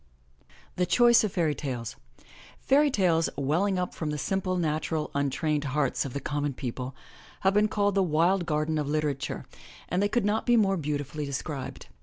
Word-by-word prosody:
THE 180 Hz, 0 st, +1 dB
CHOICE 240 Hz, -1 st, +5 dB
OF 210 Hz, -, -1 dB
FAIRY 160 Hz, -4 st, +1 dB
TALES 125 Hz, -6 st, -5 dB, 0.7 s
^AIRY 285 Hz, +2 st, +5 dB
tales, 170 Hz, -7 st, +2 dB
welling 170 Hz, +8 st, +1 dB
up 180 Hz, 0 st, -2 dB
from 155 Hz, -, -4 dB
the 150 Hz, -, -2 dB
simple, 185 Hz, +3 st, -1 dB
nat 155 Hz, -3 st, -1 dB
ural, 160 Hz, -2 st, -2 dB
untrained 145 Hz, +2 st, 0 dB
hearts 140 Hz, -1 st, 0 dB
of 130 Hz, -, -6 dB
the 140 Hz, -, -2 dB
common 145 Hz, -1 st, -2 dB
people, 125 Hz, +1 st, -5 dB, 0.5 s
have 190 Hz, 0 st, +3 dB
been 210 Hz, +1 st, +4 dB
called 205 Hz, -1 st, +1 dB
the 195 Hz, -, +3 dB
wild 175 Hz, +2 st, +2 dB
garden 155 Hz, 0 st, 0 dB
of 150 Hz, -, -2 dB
literature 145 Hz, -4 st, -2 dB, 0.4 s
and 180 Hz, +3 st, +1 dB
they 205 Hz, -, +2 dB
could 210 Hz, 0 st, +1 dB
not 215 Hz, +3 st, 0 dB
be 240 Hz, -1 st, +5 dB
more 195 Hz, -3 st, +3 dB
beautifully 145 Hz, -1 st, -3 dB
des 140 Hz, -2 st, -3 dB
cribed. 135 Hz, -3 st, -6 dB
155 Hz, 185 wpm, -27 LUFS, 145-195 Hz, 0.7 s, CHOICE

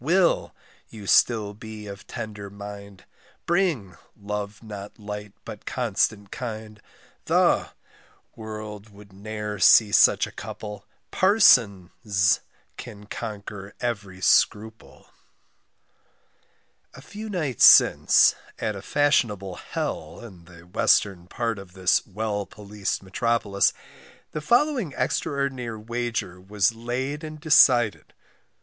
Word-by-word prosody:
=Will= 175 Hz, +4 st, +2 dB, 0.3 s
you 110 Hz, -, -11 dB
be -, -, -10 dB
still 105 Hz, 0 st, +2 dB
of 105 Hz, -3 st, -9 dB
tender 105 Hz, -2 st, -7 dB
mind; 100 Hz, -1 st, -10 dB, 0.4 s
=Bring= 160 Hz, -, 0 dB, 0.2 s
love 105 Hz, +1 st, -5 dB
not 105 Hz, -2 st, -9 dB
light, 105 Hz, -1 st, -7 dB
but -, -, -10 dB
constant 100 Hz, -2 st, -1 dB
kind, 110 Hz, -3 st, -7 dB, 0.4 s
=The= -, -, +2 dB, 0.7 s
world 110 Hz, -1 st, -8 dB
would 100 Hz, -1 st, -17 dB
ne'er 105 Hz, +1 st, -6 dB
see 105 Hz, +1 st, +6 dB
such -, -, +5 dB
a -, -, -11 dB
couple; 105 Hz, -2 st, -8 dB, 0.2 s
=Parson= 125 Hz, -, +4 dB
's 95 Hz, -4 st, +2 dB, 0.4 s
can 105 Hz, 0 st, -10 dB
conquer 100 Hz, -1 st, -7 dB
every 100 Hz, -6 st, -4 dB
scruple, 110 Hz, +4 st, 0 dB, 1.8 s
A -, -, -12 dB
few 215 Hz, +1 st, -8 dB
nights 155 Hz, -, +2 dB
since, -, -, +7 dB, 0.2 s
at 105 Hz, -, -3 dB
a 100 Hz, -, -7 dB
fashionable 105 Hz, -8 st, +1 dB
hell -, -, -5 dB
in 95 Hz, -8 st, -13 dB
the 85 Hz, -1 st, -15 dB
western 90 Hz, 0 st, +1 dB
part 115 Hz, +1 st, -3 dB
of 95 Hz, -2 st, -13 dB
this 95 Hz, -1 st, +2 dB
well 105 Hz, 0 st, -3 dB
policed 105 Hz, -1 st, -5 dB
metropolis, 100 Hz, 0 st, +1 dB, 0.6 s
the 155 Hz, -, -5 dB
following 240 Hz, -, +1 dB
extraordinary 135 Hz, -6 st, -2 dB
wager 115 Hz, -5 st, -4 dB
was 100 Hz, +3 st, +1 dB
laid 130 Hz, +6 st, -4 dB
and 155 Hz, -1 st, -8 dB
decided. 120 Hz, -, +4 dB
105 Hz, 110 wpm, -24 LUFS, 100-120 Hz, 1.8 s, since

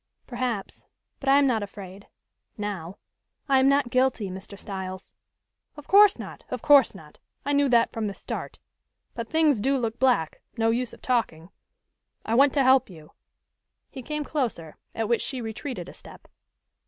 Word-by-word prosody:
"Perhaps, 240 Hz, -5 st, -4 dB, 0.4 s
but 275 Hz, -, -2 dB
I 275 Hz, -, +6 dB
am 285 Hz, -, +4 dB
not 240 Hz, -5 st, +1 dB
afraid 200 Hz, -1 st, -9 dB, 0.5 s
now. 195 Hz, -4 st, -5 dB, 0.5 s
I 270 Hz, -2 st, +4 dB
am 265 Hz, +1 st, +4 dB
not 275 Hz, -3 st, +2 dB
guilty, 255 Hz, -6 st, +1 dB
Mr. 190 Hz, +2 st, -9 dB
Styles." 190 Hz, -2 st, -7 dB, 0.6 s
"Of 295 Hz, -, -11 dB
course 405 Hz, 0 st, +6 dB
not! -, -, -9 dB
Of -, -, -5 dB
course 280 Hz, -7 st, +6 dB
not! 155 Hz, -5 st, -14 dB, 0.3 s
I 285 Hz, -, 0 dB
knew 285 Hz, -1 st, +3 dB
that 235 Hz, -1 st, +3 dB
from 220 Hz, -2 st, -2 dB
the 200 Hz, -, -5 dB
start. -, -, -6 dB, 0.6 s
But 230 Hz, -1 st, -6 dB
things 315 Hz, -6 st, +3 dB
do 270 Hz, +6 st, +1 dB
look 230 Hz, -2 st, -3 dB
black, 245 Hz, -12 st, +1 dB, 0.2 s
no 225 Hz, 0 st, +2 dB
use 245 Hz, +1 st, -1 dB
of -, -, -15 dB
talking. 195 Hz, -9 st, -1 dB, 0.7 s
I 220 Hz, -, -2 dB
want 275 Hz, +4 st, +5 dB
to 280 Hz, -, +3 dB
help 260 Hz, -2 st, +4 dB
you." 155 Hz, -4 st, -14 dB, 0.8 s
He 265 Hz, -, -8 dB
came 300 Hz, +4 st, -4 dB
closer, 235 Hz, -, -3 dB, 0.2 s
at 225 Hz, -1 st, -1 dB
which 235 Hz, 0 st, +1 dB
she 260 Hz, -, -3 dB
retreated 240 Hz, +4 st, -6 dB
a -, -, -10 dB
step. -, -, -14 dB
235 Hz, 170 wpm, -26 LUFS, 200-275 Hz, 0.8 s, I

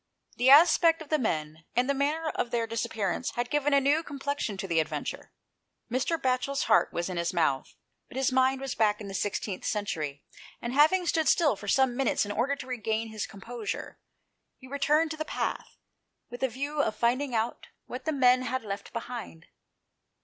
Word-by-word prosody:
The 250 Hz, +2 st, +4 dB
aspect 330 Hz, +3 st, +7 dB
of 295 Hz, -, -18 dB
the 310 Hz, -, +2 dB
men, 155 Hz, -, -2 dB
and 245 Hz, +1 st, +2 dB
the 280 Hz, -, +2 dB
manner 300 Hz, +4 st, 0 dB
of 245 Hz, -, -2 dB
their 235 Hz, -1 st, 0 dB
disappearance, 225 Hz, -2 st, -2 dB
had 240 Hz, 0 st, -2 dB
given 295 Hz, 0 st, +1 dB
a 280 Hz, -, +6 dB
new 285 Hz, +4 st, +3 dB
complexion 285 Hz, -8 st, -3 dB
to 195 Hz, -, -4 dB
the 165 Hz, -2 st, +2 dB
adventure. 160 Hz, -, -3 dB, 0.6 s
Mr. 265 Hz, +7 st, 0 dB
Batchel's 260 Hz, +1 st, 0 dB
heart 220 Hz, -, +3 dB
was 170 Hz, 0 st, -2 dB
in 185 Hz, -2 st, -4 dB
his 170 Hz, +1 st, -1 dB
mouth, 140 Hz, -6 st, 0 dB, 0.3 s
but -, -, -10 dB
his 265 Hz, -1 st, +2 dB
mind 260 Hz, +1 st, +2 dB
was 270 Hz, -2 st, -3 dB
back 210 Hz, -1 st, +2 dB
in 210 Hz, -, -7 dB
the -, -, -7 dB
16th 195 Hz, 0 st, -3 dB
century; 155 Hz, -9 st, -3 dB, 0.4 s
and 235 Hz, +1 st, -4 dB
having 315 Hz, +6 st, +4 dB
stood 320 Hz, -2 st, +1 dB
still 300 Hz, -9 st, +4 dB
for 205 Hz, +1 st, -10 dB
some 260 Hz, +3 st, +3 dB
minutes 265 Hz, -4 st, +1 dB
in 205 Hz, -, -4 dB
order 250 Hz, +7 st, 0 dB
to 270 Hz, -, -8 dB
regain 225 Hz, -3 st, -2 dB
his 215 Hz, -2 st, -4 dB
composure, 225 Hz, +2 st, -6 dB, 0.6 s
he 260 Hz, -, -14 dB
returned 295 Hz, +4 st, +2 dB
to 315 Hz, -, -5 dB
the 310 Hz, -, -2 dB
path, -, -, -4 dB, 0.5 s
with 245 Hz, -, -8 dB
a 265 Hz, -, +3 dB
view 285 Hz, +5 st, -2 dB
of 215 Hz, -6 st, -1 dB
finding 245 Hz, +3 st, 0 dB
out 225 Hz, +2 st, -2 dB, 0.2 s
what 255 Hz, +1 st, -7 dB
the 315 Hz, -, +1 dB
men 255 Hz, -3 st, +4 dB
had 260 Hz, 0 st, -2 dB
left 200 Hz, -1 st, -6 dB
behind. 230 Hz, -8 st, -6 dB
250 Hz, 195 wpm, -28 LUFS, 210-280 Hz, 0.6 s, aspect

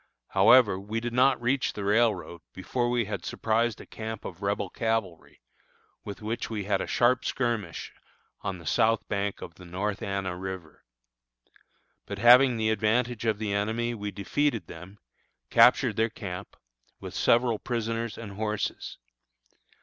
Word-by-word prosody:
However, 105 Hz, -7 st, +5 dB
we 105 Hz, +3 st, -3 dB
did 120 Hz, +1 st, -4 dB
not 130 Hz, +1 st, +4 dB
reach 125 Hz, +2 st, 0 dB
the 105 Hz, -, -5 dB
railroad 105 Hz, -5 st, +1 dB
before 120 Hz, +6 st, -1 dB
we 120 Hz, -2 st, +1 dB
had 105 Hz, -, -5 dB
surprised 115 Hz, 0 st, 0 dB
a -, -, -10 dB
camp 110 Hz, 0 st, -7 dB
of 90 Hz, +2 st, -8 dB
Rebel 100 Hz, -1 st, -1 dB
cavalry, 110 Hz, -7 st, -3 dB, 0.6 s
with 100 Hz, +1 st, -8 dB
which 110 Hz, +2 st, -3 dB
we 110 Hz, -3 st, -3 dB
had 95 Hz, -1 st, 0 dB
a -, -, -4 dB
sharp 125 Hz, +1 st, +2 dB
skirmish 115 Hz, -9 st, -2 dB, 0.5 s
on 95 Hz, -2 st, -3 dB
the 85 Hz, -, -13 dB
south 110 Hz, +7 st, +2 dB
bank 100 Hz, -1 st, -2 dB
of 85 Hz, -, -9 dB
the 90 Hz, -, -15 dB
North 100 Hz, +4 st, -3 dB
Anna 95 Hz, -2 st, -3 dB
River. 95 Hz, -4 st, -7 dB, 1.2 s
But 100 Hz, -, -5 dB
having 120 Hz, +3 st, +7 dB
the 110 Hz, 0 st, +1 dB
advantage 115 Hz, +2 st, 0 dB
of 110 Hz, -2 st, +1 dB
the 105 Hz, -2 st, -2 dB
enemy, 110 Hz, +4 st, -1 dB
we 105 Hz, -2 st, -4 dB
defeated 110 Hz, -, -1 dB
them, 90 Hz, +5 st, -11 dB, 0.5 s
captured -, -, +5 dB
their 115 Hz, +1 st, +2 dB
camp, 95 Hz, -2 st, -7 dB, 0.4 s
with -, -, -8 dB
several 120 Hz, -2 st, +2 dB
prisoners 115 Hz, -2 st, -3 dB
and 110 Hz, -3 st, -8 dB
horses. 105 Hz, +1 st, -3 dB
110 Hz, 150 wpm, -27 LUFS, 100-120 Hz, 1.2 s, having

